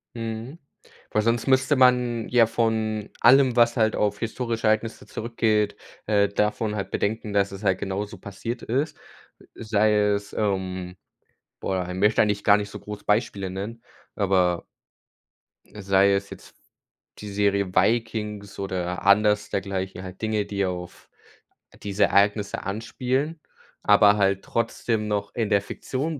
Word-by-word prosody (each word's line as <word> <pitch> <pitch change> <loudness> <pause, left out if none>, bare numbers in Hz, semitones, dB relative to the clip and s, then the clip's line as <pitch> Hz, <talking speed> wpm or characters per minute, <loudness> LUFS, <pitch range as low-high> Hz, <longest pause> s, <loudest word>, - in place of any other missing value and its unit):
Mhm. 115 +6 -6 0.5
Weil 110 - +2
sonst 115 +3 0
müsste 130 +2 +3
man 125 -3 +3
ja 120 -2 +5
von 110 -2 -1
allem, 130 0 +6
was 120 -1 +4
halt 110 -1 +2
auf 105 0 0
historische 115 -1 -2
Ereignisse 110 +1 0
zurückgeht, 110 -2 0 0.3
äh, 100 -1 +2
davon 105 +1 -1
halt 100 -2 -4
bedenken, 105 0 -2
dass 100 -1 +2
es 100 +1 -9
halt 95 -2 +1
genauso 100 +1 -4
passiert 115 +5 -6
ist. 140 +7 -1 0.6
Sei 110 -1 +1
es, 105 -1 0
ähm 95 -3 -2 0.7
boah, 95 -2 -2
ich 90 - -5
möchte 105 +4 +3
eigentlich 105 -1 -1
gar 100 - +6
nicht 100 -1 -4
so - - -8
groß 105 0 -8
Beispiele 100 -3 0
nennen, 105 +5 -6 0.3
aber 95 -3 +1 1.0
sei 100 -1 +2
es 100 0 -1
jetzt - - -12 0.6
die 105 - -7
Serie 100 -2 0
Vikings 105 0 0
oder 90 -2 -3
anders 105 +1 +4
dergleichen. 95 -1 -3
Halt 95 0 -10
Dinge, 110 -2 0
die 100 -1 -1
auf 90 -1 -6 0.7
diese 100 0 +2
Ereignisse 100 +1 +1
anspielen, 125 +9 -2 0.4
aber 105 0 +6
halt 100 -1 +1
trotzdem 115 -1 -1
noch 100 -1 -2
in 115 -3 -1
der 100 -2 +3
Fiktion 140 +9 -4
105 Hz, 140 wpm, -24 LUFS, 100-115 Hz, 1.0 s, allem